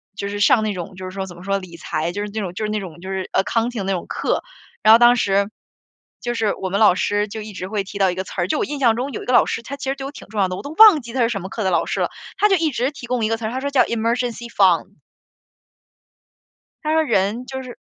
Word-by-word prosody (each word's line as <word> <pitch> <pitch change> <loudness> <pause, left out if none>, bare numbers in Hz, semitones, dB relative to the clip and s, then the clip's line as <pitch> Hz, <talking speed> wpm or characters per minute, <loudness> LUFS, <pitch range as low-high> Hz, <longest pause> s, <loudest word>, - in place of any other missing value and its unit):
就 200 -1 -4
是 205 0 -4
上 220 +2 +4
那 215 -1 -1
种 180 0 -7
就 185 - -8
是 185 - -6
说 195 0 -4
怎 175 -2 -11
么 175 - -12
说 195 +1 0
理 180 -3 -11
财， 160 +1 -2
就 205 +3 -4
是 210 - -4
那 220 - -2
种 185 -4 -4
就 200 - -4
是 210 - -2
那 215 - -1
种 175 -4 -9
就 190 - -7
是 190 -1 -3
Accounting 230 +1 0
那 195 - -1
种 180 - -3
课。 - - -1 0.4
然 215 - +7
后 225 - +9
当 240 0 +6
时， 200 -1 +1 0.7
就 240 0 -2
是 220 -3 0
我 190 - -4
们 200 - 0
老 210 -5 +6
师 205 +2 0
就 220 +2 -6
一 215 0 -8
直 185 -1 -5
会 205 0 -2
提 200 +1 -8
到 190 -2 +3
一 - - -5
个 190 - -3
词 - - -11
儿 175 - 0
就 - - 0
我 - - +1
印 290 - -5
象 235 -4 +4
中 270 +3 -2
有 - - -6
一 - - -10
个 250 - 0
老 - - +6
师， 230 - -3
他 280 - -7
其 275 - -5
实 270 - 0
对 270 - -7
我 275 - -5
挺 - - -12
重 215 0 -4
要 190 - +3
的， 185 - -4
我 - - -7
都 285 - -6
忘 415 -4 +8
记 235 -1 -10
他 255 - 0
是 230 - +4
什 200 -5 -3
么 190 - -7
课 220 - -4
的 190 - +2
老 170 - +2
师 - - -2
了， - - +1 0.3
他 420 - +4
就 390 - +5
一 320 -4 +1
直 250 +2 0
提 275 -4 -10
供 245 -2 -1
一 - - 0
个 225 - +1
词 225 - -6
儿， 220 - -2
他 260 - -3
说 280 +1 -2
叫 275 -2 +4
Emergency 235 +1 -2
fund。 195 -1 +2 1.9
他 305 - 0
说 320 0 +3
人 225 -1 0
就 265 0 -6
是 255 -1 -9
215 Hz, 400 characters per minute, -21 LUFS, 190-245 Hz, 1.9 s, 后